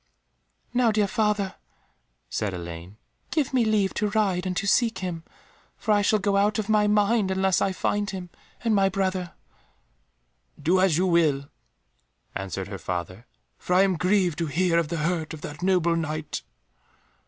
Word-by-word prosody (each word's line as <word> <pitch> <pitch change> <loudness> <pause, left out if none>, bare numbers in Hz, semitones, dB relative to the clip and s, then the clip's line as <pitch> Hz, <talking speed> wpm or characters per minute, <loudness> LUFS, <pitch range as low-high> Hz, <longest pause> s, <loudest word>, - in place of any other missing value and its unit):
"Now, 245 -2 +3
dear 210 -1 +2
father," 205 -2 0 0.7
said 105 -4 -2
Elaine, 85 +3 -8 0.3
"give 295 -5 -1
me 250 -2 +3
leave 215 -3 +1
to 210 - 0
ride 195 -4 0
and 180 -1 -2
to - - -1
seek 230 +2 +2
him, 175 -3 -4 0.5
for 220 - -1
I 205 -1 +4
shall 215 +1 +3
go 200 -1 +1
out 210 +2 +2
of 215 -2 -2
my 210 -1 +3
mind 210 0 +2
unless 190 0 +1
I 195 - +2
find 205 +2 -1
him 185 -3 -6 0.3
and 230 -2 +2
my 195 -1 +4
brother." 185 -2 -2 1.3
"Do 175 +6 +2
as 185 -5 +3
you 185 - +2
will," 155 -6 +2 0.8
answered 95 0 -4
her 100 -1 -7
father, 90 +6 -5 0.3
"for 180 - -1
I 190 - +6
am 190 -2 +2
grieved 180 -2 +1
to 165 - -1
hear 170 +3 +2
of 165 - -1
the 170 +2 -3
hurt 165 -2 -2
of 150 - -13
that 145 0 -8
noble 180 -2 +2
Knight." 155 -2 -3
185 Hz, 170 wpm, -25 LUFS, 160-205 Hz, 1.3 s, I